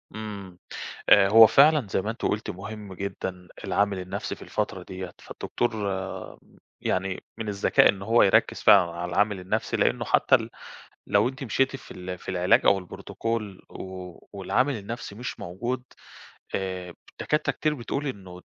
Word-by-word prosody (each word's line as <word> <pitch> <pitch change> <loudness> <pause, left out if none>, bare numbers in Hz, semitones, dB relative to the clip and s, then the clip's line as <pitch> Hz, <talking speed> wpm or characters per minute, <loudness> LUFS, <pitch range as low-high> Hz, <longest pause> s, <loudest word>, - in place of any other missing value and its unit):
امم، 100 -4 -7 0.5
آآ، 95 -1 +7
هو 110 +2 +9
فعلًا 145 -3 +5
زي 95 - 0
ما 105 - -2
أنتِ 115 - -8
قلتِ 105 +1 -1
مهم 100 +1 -8
جدًا 95 -1 -5 0.2
العامل 100 -2 +1
النفْسِي 95 +2 -4
في - - -15
الفترة 95 - -3
ديَّة، 95 -1 -7
فالدكتور 120 - -3 1.1
يعني 95 0 -2
من 110 -2 -4
الذكاء 100 -1 +4
إن 95 -1 -1
هو 115 +4 +4
يركز 95 - +3
فعلًا 85 - +6
على 85 +1 -4
العامل 105 0 +1
النفْسِي؛ 90 - -2
لأنه - - +1
حتى - - +3
ال - - +2 0.6
لو - - +3
أنتِ 135 +2 -7
مشيتِ 135 +2 +1
في - - -15
ال 90 0 -6
في - - -16
العلاج 90 0 +3
أو 95 -2 +3
الProtocol 110 -3 -4
و 90 -2 -8
والعامل 110 +8 0
النفْسِي 105 0 -7
مش 120 +4 -6
موجود، 120 +9 -4 0.7
آآ، 95 -2 -4 0.2
الدكاترة 150 +1 -1
كتير 155 -1 0
بتقول 140 +2 -3
إنه 100 -8 -7
100 Hz, 155 wpm, -26 LUFS, 95-115 Hz, 1.1 s, هو